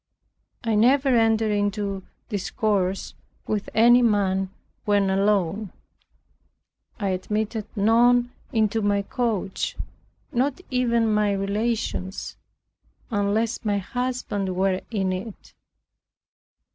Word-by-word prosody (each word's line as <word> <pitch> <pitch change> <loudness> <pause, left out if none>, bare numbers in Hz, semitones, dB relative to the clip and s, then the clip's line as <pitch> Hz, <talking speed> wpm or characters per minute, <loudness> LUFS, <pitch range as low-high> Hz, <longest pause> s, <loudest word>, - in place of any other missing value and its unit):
I 225 -1 0
never 260 +6 +4
entered 225 -3 +3
into 205 -1 -1 0.3
discourse 195 -2 -1 0.3
with 210 -1 -2
any 240 +3 +6
man 195 -4 +2 0.3
when 205 -2 +2
alone. 200 0 +1 1.3
I 200 -2 0
admitted 210 +3 -2
none 240 +3 +4 0.2
into 220 -1 +1
my 205 -1 +1
coach, 215 -4 -2 0.5
not 270 +7 0
even 235 -3 +2
my 210 -1 +2
relations, 200 -1 -2 0.8
unless 215 +2 0
my 205 -2 +1
husband 205 -3 -3
were 190 0 +1
in 190 -4 -1
it. 195 +3 -8
210 Hz, 95 wpm, -24 LUFS, 195-230 Hz, 1.3 s, any